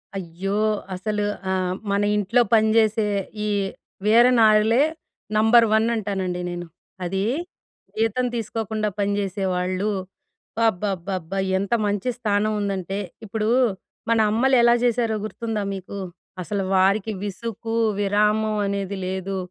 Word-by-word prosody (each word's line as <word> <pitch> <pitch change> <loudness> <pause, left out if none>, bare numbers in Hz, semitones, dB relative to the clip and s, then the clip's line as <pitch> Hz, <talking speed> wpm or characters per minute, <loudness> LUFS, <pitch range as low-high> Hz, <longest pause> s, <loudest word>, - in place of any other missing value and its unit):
అయ్యో! 190 +2 -3 0.4
అసలు 210 +3 -2 0.3
ఆహ్, 185 -1 0 0.2
మన 200 0 +2
ఇంట్లో 210 +4 +2
పని 220 -1 +5
జేసే, 220 -1 +3 0.4
ఈ - - -1 0.6
వీర 230 +3 +6
నారులే 220 +3 +5 0.5
నంబర్ 225 +2 +6
వన్ 220 +1 +3
అంటానండి 190 -4 -2
నేను. 175 0 -5 0.4
అదీ 190 +2 -1 0.7
జీతం 225 +3 +1
తీసుకోకుండా 220 -1 -2
పని 200 0 +1
చేసే 195 0 -2
వాళ్ళు. 185 +3 -1 0.8
అబ్బబ్బబ్బబ్బా! 190 -2 -2 0.2
ఎంత 200 +3 -2
మంచి 205 +4 -1
స్థానం 210 -2 +1
ఉందంటే, 195 -1 -2 0.3
ఇప్పుడూ, 215 +1 -2 0.6
మన 230 -1 +3
అమ్మలెలా 240 +1 +4
చేశారో 235 -2 +1
గుర్తుందా 220 -1 -3
మీకు? 190 +1 -8 0.4
అసలు 195 +2 -2
వారికి 195 +3 +3
విసుకు, 225 +2 -5 0.3
విరామం 210 +2 +2
అనేది 200 0 -2
లేదు. 190 +1 -3
205 Hz, 115 wpm, -23 LUFS, 195-220 Hz, 0.8 s, వీర